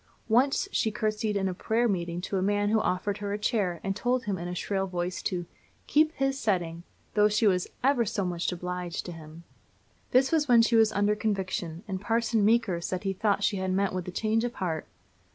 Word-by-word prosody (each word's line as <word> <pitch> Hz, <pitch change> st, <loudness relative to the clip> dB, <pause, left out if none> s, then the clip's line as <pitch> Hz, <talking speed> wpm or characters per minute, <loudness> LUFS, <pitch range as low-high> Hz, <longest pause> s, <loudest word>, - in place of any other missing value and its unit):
Once 265 Hz, -, +3 dB
she 220 Hz, -, +1 dB
courtesied 215 Hz, 0 st, -1 dB
in 195 Hz, -1 st, 0 dB
a 185 Hz, -, -1 dB
prayer 225 Hz, +6 st, +1 dB
meeting 175 Hz, -4 st, -2 dB
to 195 Hz, -, -4 dB
a -, -, -1 dB
man 205 Hz, +1 st, +1 dB
who 220 Hz, +1 st, +3 dB
offered 195 Hz, +2 st, -1 dB
her 205 Hz, -1 st, -3 dB
a -, -, -1 dB
chair, 205 Hz, -6 st, 0 dB
and 195 Hz, 0 st, -1 dB
told 245 Hz, +4 st, 0 dB
him, 205 Hz, -3 st, -1 dB
in 175 Hz, -1 st, -5 dB
a 180 Hz, -, -4 dB
shrill 195 Hz, +1 st, -1 dB
voice, 180 Hz, 0 st, -3 dB
to 175 Hz, -2 st, -2 dB, 0.4 s
"keep 310 Hz, +1 st, +3 dB
his 270 Hz, -1 st, -1 dB
setting," 175 Hz, -8 st, -1 dB, 0.3 s
though 210 Hz, 0 st, +4 dB
she 210 Hz, +2 st, +1 dB
was 180 Hz, -3 st, +2 dB, 0.2 s
"ever 265 Hz, -2 st, +4 dB
so 200 Hz, -2 st, -2 dB
much 175 Hz, 0 st, -1 dB
obleeged" 180 Hz, -1 st, -4 dB
to 175 Hz, -, -5 dB
him. 160 Hz, 0 st, -11 dB, 0.7 s
This 260 Hz, +1 st, +3 dB
was 310 Hz, -3 st, +2 dB
when 235 Hz, -2 st, +6 dB
she 230 Hz, +1 st, +2 dB
was 220 Hz, -1 st, +5 dB
under 205 Hz, 0 st, +2 dB
conviction, 190 Hz, -5 st, -2 dB
and 190 Hz, -2 st, -4 dB
Parson 225 Hz, 0 st, +1 dB
Meeker 210 Hz, -5 st, +2 dB
said 185 Hz, +2 st, -3 dB
he 195 Hz, -1 st, -1 dB
thought 200 Hz, +1 st, 0 dB
she 200 Hz, -, +1 dB
had 190 Hz, 0 st, -1 dB
met 195 Hz, 0 st, +1 dB
with 185 Hz, -1 st, -4 dB
a -, -, -4 dB
change 220 Hz, +4 st, 0 dB
of 240 Hz, 0 st, -3 dB
heart. 165 Hz, -5 st, -3 dB
200 Hz, 220 wpm, -28 LUFS, 180-225 Hz, 0.7 s, when